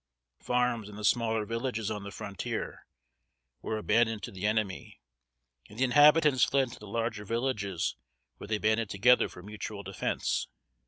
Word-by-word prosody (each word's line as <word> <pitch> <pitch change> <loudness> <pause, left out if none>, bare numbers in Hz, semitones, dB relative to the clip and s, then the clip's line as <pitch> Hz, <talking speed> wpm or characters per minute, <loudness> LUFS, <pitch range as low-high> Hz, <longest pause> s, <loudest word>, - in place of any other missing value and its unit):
Farms, 125 -3 0
and 105 - -10
the 105 - -4
smaller 110 -1 +2
villages 115 -1 -2
on 105 -1 -3
the 100 - -7
frontier, 100 0 -5 0.7
were 110 - -2
abandoned 110 -1 +1
to - - -5
the 95 +2 -2
enemy; 105 -3 -2 0.7
and 105 - -13
the 130 - +1
inhabitants 145 0 +6
fled 135 -3 +2
to - - -11
the 105 - -11
larger 115 0 -2
villages, 105 -5 -1 0.4
where - - -9
they 110 0 0
banded 110 0 +1
together 125 +6 +4
for 90 - -12
mutual 105 0 -6
defense. 95 -1 -2
110 Hz, 155 wpm, -30 LUFS, 105-120 Hz, 0.7 s, inhabitants